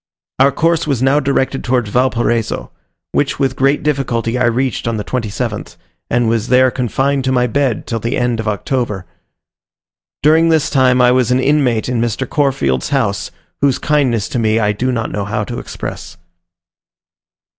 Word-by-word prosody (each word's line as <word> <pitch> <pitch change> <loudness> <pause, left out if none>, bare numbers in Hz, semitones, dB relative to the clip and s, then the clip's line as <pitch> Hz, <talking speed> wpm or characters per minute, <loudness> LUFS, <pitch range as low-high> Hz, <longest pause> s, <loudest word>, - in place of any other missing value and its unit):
Our 135 +1 +5
course 165 +2 +1
was 135 -4 0
now 135 +2 +4
directed 135 -1 -1
towards 120 -4 0
Valparaiso, 120 -2 0 0.4
which 140 - 0
with 135 -2 0
great 135 +3 +1
difficulty 125 -5 -1
I 125 - +1
reached 120 0 0
on 115 -1 -1
the 105 - -3
27th, 115 -2 -4 0.3
and 120 -1 +1
was 115 -1 0
there 130 +1 +4
confined 135 +3 0
to 130 - +1
my 125 -1 +2
bed 130 -1 0
till 115 - -3
the 115 +3 -2
end 120 -2 0
of 110 - -3
October. 105 -2 -2 1.2
During 160 +2 +4
this 160 -2 +2
time 130 -2 +3
I 125 - +5
was 125 -2 +2
an 125 +1 +2
inmate 130 -5 +1
in 125 -2 -1
Mr. 120 +3 -2
Corfield's 70 - 0
house, 120 -8 0 0.3
whose 140 -2 +3
kindness 130 -8 +1
to 125 - -2
me 110 -1 +2
I 105 -2 +2
do 125 +5 -1
not 115 -2 -2
know 100 -1 -3
how 105 +1 -2
to 120 +3 -5
express. - - -7
125 Hz, 170 wpm, -16 LUFS, 115-135 Hz, 1.2 s, Our